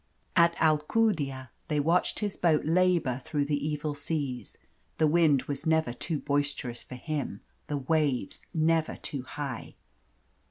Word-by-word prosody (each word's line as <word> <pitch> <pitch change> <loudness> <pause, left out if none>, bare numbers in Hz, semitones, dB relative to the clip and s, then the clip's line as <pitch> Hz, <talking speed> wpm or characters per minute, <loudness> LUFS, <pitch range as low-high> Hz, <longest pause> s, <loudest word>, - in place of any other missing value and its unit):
At 170 -1 +5
Alcudia 150 - +1 0.2
they 150 -3 0
watched 165 +9 +2
his 205 -2 -1
boat 160 -4 +2
labour 165 -6 +2
through 145 -2 -1
the 145 0 -1
evil 150 0 -2
seas. 145 -6 -3 0.4
The 160 - +4
wind 155 -4 +4
was 145 +2 -4
never 160 -6 +2
too 160 +5 -2
boisterous 140 -4 -1
for 125 - -9
him, 140 -6 -4 0.3
the 145 - -1
waves 140 -5 0
never 160 0 +2
too 140 -5 -4
high. 135 -1 -6
150 Hz, 135 wpm, -29 LUFS, 140-160 Hz, 0.4 s, At